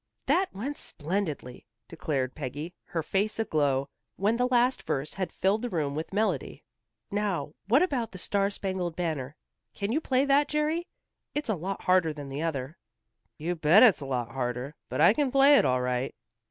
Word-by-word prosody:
"That 375 +1 +2
went 260 +9 -5
splendidly," 155 -7 -3 0.2
declared 140 -6 -2
Peggy, 150 +4 -5
her 165 -2 -3
face 200 +6 0
aglow, 145 -10 +1 0.3
when 205 +4 +1
the 250 +1 +2
last 250 +1 +2
verse 140 +2 -2
had 185 -2 -3
filled 195 +4 +1
the 245 - -3
room 150 -7 -1
with 155 +3 -4
melody. 200 -8 -1 0.5
"Now, 200 -7 -1
what 265 - +5
about 265 -10 -1
'The 190 - -9
Star 200 +2 +1
Spangled 185 -4 -3
Banner?' 150 -6 -3 0.4
Can 200 +1 -2
you 305 +6 +1
play 265 -2 +2
that, 280 +1 +4
Jerry? 310 +4 0 0.5
It's 295 -4 -2
a 220 - +2
lot 185 +3 -5
harder 180 -4 +3
than 145 -2 -8
the 140 +2 -4
other." 155 -1 -3 0.6
"You 165 +3 -2
bet 165 +6 +6
it's 225 -7 +6
harder, 125 0 -3 0.2
but - - -1
I 170 +6 +7
can 280 0 0
play 275 +2 +7
it - - +2
all 125 0 +2
right." 125 +1 -1
180 Hz, 175 wpm, -28 LUFS, 145-225 Hz, 0.6 s, I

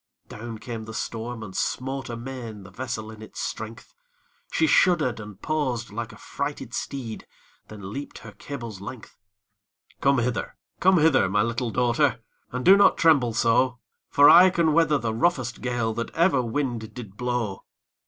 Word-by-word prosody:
Down 115 +1 -7
came 110 +1 -6
the 110 0 -8
storm, 115 0 -4
and 95 -3 -9
smote 135 +1 -2
amain 115 -3 -7
The 95 - -13
vessel 110 0 -5
in 110 -1 -12
its 110 - -10
strength; 110 +1 -6 0.6
She 160 - +2
shudder'd 155 -8 +3
and 105 -2 -10
paused, 130 -6 -2
like 115 +2 -5
a - - -13
frighted 140 -4 -5
steed, 120 -6 -5 0.4
Then 100 -2 -9
leap'd 140 +1 -6
her - - -11
cable's 115 -9 -8
length. 110 +3 -9 0.9
'Come 140 0 +4
hither! 120 0 -2 0.2
come 190 +1 +5
hither! 150 - +4
my 105 +2 +2
little 115 +1 -2
daughtèr. 125 +4 +2 0.3
And 125 0 -4
do 195 - +9
not 200 - +5
tremble 140 -9 +4
so; 120 +2 +2 0.3
For 145 0 +6
I 185 +4 +9
can 170 -4 +2
weather 155 -2 +4
the 115 -4 -2
roughest 130 -1 0
gale 120 -3 -1
That 115 +1 -3
ever 165 -5 +3
wind 120 -3 -3
did 110 -6 -9
blow.' 120 -4 -2
120 Hz, 165 wpm, -25 LUFS, 110-140 Hz, 0.9 s, do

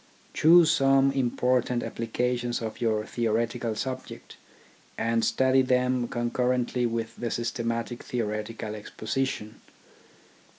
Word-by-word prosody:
Choose 165 0 +6
some 135 -2 +4
important 125 -2 +1
appli 115 0 -5
cations 120 0 0
of 110 0 -6
your 110 -2 +1
theoretical 115 0 -1
subject; 130 +3 -6 0.6
and 115 0 +1
study 130 +3 +3
them 125 -1 +1
concurrently 125 +1 0
with 115 0 -3
the 120 - -3
systematic 115 0 -3
theoretical 110 -1 -4
exposition. 110 +1 -4
120 Hz, 100 wpm, -27 LUFS, 115-130 Hz, 0.6 s, Choose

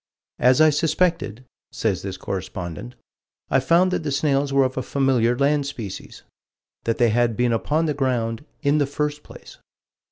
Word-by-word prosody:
"As 125 +3 +4
I 155 0 +6
suspected," 150 - 0 0.3
says 100 -5 -1
this 95 -1 -5
correspondent, 95 +4 -6 0.6
"I 135 - +4
found 170 +7 +3
that - - -1
the 155 - -3
snails 140 -1 +1
were 135 0 +4
of 130 0 -1
a 130 - -1
familiar 125 -3 +1
land 140 +1 +1
species" 115 -9 -8 0.6
that 115 - 0
they 120 -2 +3
had 115 0 +1
been 120 -1 +2
upon 150 +8 0
the 150 - 0
ground 125 -4 -1 0.2
"in 145 +1 +3
the 145 - +1
first 150 +1 -2
place." - - -14
135 Hz, 165 wpm, -22 LUFS, 115-145 Hz, 0.6 s, I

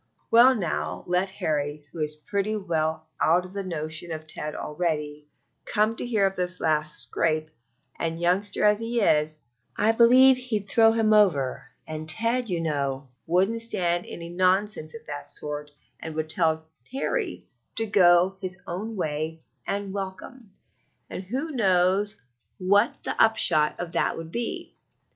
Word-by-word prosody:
Well, 245 +3 +7
now, 175 -8 -3
let 180 +2 +1
Harold, 150 -6 -2
who 165 - -9
is 150 0 -2
pretty 200 +7 -2
well 160 -5 -2 0.2
out 175 +3 +3
of 185 - -12
the 200 - -3
notion 160 -2 -4
of 155 -1 -5
Ted 150 -1 -4
already, 150 -2 -3 0.4
come 215 +1 +1
to - - -2
hear 215 -5 +2
of 195 0 0
this 180 0 -2
last 155 -1 +1
scrape, 155 +5 -1 0.5
and, 165 0 -2
youngster 185 +4 +1
as 210 0 +4
he 230 +1 -1
is, 155 -6 +2 0.4
I 215 +2 +3
believe 255 +3 +6
he'd 225 -6 -3
throw 225 +2 +5
him 220 -1 +2
over; 145 -12 +2 0.2
and 155 0 -6
Ted, 230 +7 +1
you 175 -2 -1
know, 140 -4 -2 0.2
wouldn't 190 +7 +1
stand 175 -6 -1
any 170 0 -8
nonsense 185 -1 0
of 230 - -11
that 145 -1 -6
sort 150 0 -5 0.3
and 160 -1 -7
would 155 0 -1
tell 160 -2 +1 0.3
Harold 375 - -2 0.3
'to 225 - 0
go 185 -2 +4
his 185 0 -4
own 210 +6 -5
way 160 -2 -3 0.2
and 200 -1 -3
welcome,' 200 +4 -7 0.6
and - - -5
who 270 - -3
knows 195 -3 +2 0.4
what 200 +5 +2
the - - -2
upshot 170 -9 +4
of 175 -1 -5
that - - 0
would 165 0 -8
be! 235 +3 -4
180 Hz, 155 wpm, -25 LUFS, 155-210 Hz, 0.6 s, Well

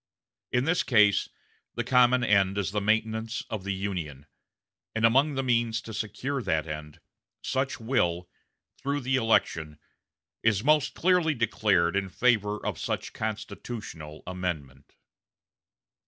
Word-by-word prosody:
In 125 +1 +1
this 165 +3 +2
case 105 -5 +4 0.5
the 120 - -1
common 125 0 +4
end 100 -3 +3
is 100 -1 -1
the 105 0 -1
maintenance 110 +2 0
of 110 -4 -3
the 100 - -2
Union; 85 -8 -4 0.7
and 110 0 +3
among 135 +6 +4
the 135 - -1
means 115 -2 +1
to 110 - -8
secure 125 +6 -3
that 80 -8 0
end, 75 -1 -7 0.4
such 130 +1 -1
will, 90 -8 0 0.5
through 140 +1 -1
the 130 +1 0
election, 80 - +1 0.6
is 110 -2 +2
most 150 0 +3
clearly 175 -3 +2
declared 105 -6 +2
in 100 -1 0
favor 105 -1 +2
of - - -2
such - - -3
constitutional 105 -7 -6
amendment." 80 -7 -5
110 Hz, 130 wpm, -27 LUFS, 95-125 Hz, 0.7 s, case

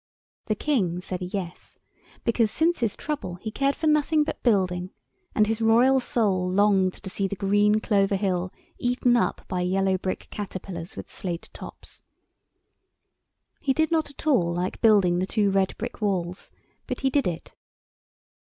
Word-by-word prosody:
The 215 - +1
King 200 - 0
said 180 0 -5
"Yes," 180 -1 -6 0.5
because 230 -1 +2
since 330 +9 +1
his 230 -4 0
trouble 285 -12 -4
he 215 +5 -6
cared 275 +4 +1
for 320 - -4
nothing 305 0 +3
but - - -5
building, 185 -5 +1 0.5
and 215 - +4
his 220 +1 -2
royal 240 +4 +5
soul 200 -7 +1
longed 190 -1 +3
to 205 - -10
see 195 0 -1
the 200 - -4
green 205 +2 +3
Clover 200 -2 +2
Hill 185 -2 -1 0.3
eaten 245 0 +2
up 240 - 0
by 180 -1 -2
yellow 190 +1 +1
brick 185 0 -4
caterpillars 185 -4 -6
with - - -7
slate 175 -3 -5
tops. - - -10 1.6
He 275 -4 +1
did 315 +2 +1
not 320 -2 +1
at 285 - -10
all 220 - +3
like 175 +2 -3
building 195 -6 +4
the 185 - -1
two 205 -1 +1
red 195 -1 +1
brick - - -6
walls, 185 -3 -2 0.4
but - - -4
he 270 -1 +1
did 280 -5 +2
it. 170 -2 -5
200 Hz, 160 wpm, -25 LUFS, 185-245 Hz, 1.6 s, royal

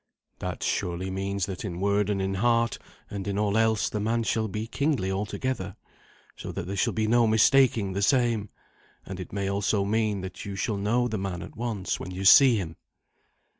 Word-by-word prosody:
"That - - -4
surely 90 +2 -2
means 95 0 -2
that 95 -3 -6
in 90 -4 -5
word 100 +1 +1
and 100 -1 0
in 95 0 -1
heart 115 +3 +1 0.3
and 100 -1 -5
in 100 0 -2
all 105 -1 +1
else 110 -1 +2
the 105 - -3
man 115 +2 0
shall 110 0 0
be 105 +2 -4
kingly 130 -6 -1
altogether, 100 0 -3 0.6
so - - -7
that - - -4
there 95 +3 -4
shall 95 - +1
be 110 -1 0
no 115 +1 +4
mistaking 110 -2 +4
the 100 - -2
same; 115 -3 +2 0.6
and 95 -1 -7
it 90 - -7
may 100 -1 -2
also 100 0 0
mean 105 -1 0
that 95 -1 -7
you 100 -2 -6
shall 100 +1 -1
know 115 +5 +1
the 110 -3 -3
man 95 -3 -4
at - - -11
once 115 -5 -3
when - - -6
you 95 +1 -5
see 130 +5 +8
him." 85 -5 -5
100 Hz, 200 wpm, -27 LUFS, 95-115 Hz, 0.6 s, see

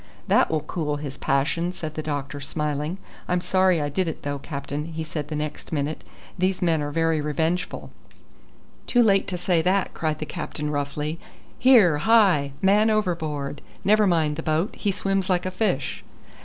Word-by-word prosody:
"That - - +4
will 155 -1 0
cool 150 -1 -2
his 145 -2 -6
passion," 155 +6 0
said 155 -4 -6
the 155 - -3
doctor, 145 -2 -4
smiling. 150 +3 -2 0.3
"I'm 180 0 +1
sorry 185 -1 +2
I 145 - -1
did 175 +5 -1
it 160 - -5
though, 145 0 -3
captain," 145 0 -5
he 160 -1 -5
said 155 -2 -4
the 155 - -4
next 150 0 -5
minute; 150 0 -2 0.4
"these 185 +1 +1
men 165 -4 +2
are 145 - -2
very 165 0 +1
revengeful." 160 +3 -2 1.0
"Too 245 -1 +4
late 195 -3 +3
to 180 - -3
say 175 -1 +2
that," 185 +2 +1
cried 155 -2 -1
the 155 - -4
captain 150 0 -4
roughly. 150 +2 -3 0.4
"Here, 215 - +6
hi! 180 -8 +4
man 210 +3 +5
overboard! 160 -9 -1 0.2
Never 210 +1 +4
mind 160 -4 +2
the - - -2
boat: 160 +6 0
he 205 - 0
swims 195 -1 -1
like 180 -1 +1
a 185 - -1
fish." 185 -9 -1
160 Hz, 175 wpm, -24 LUFS, 150-185 Hz, 1.0 s, Here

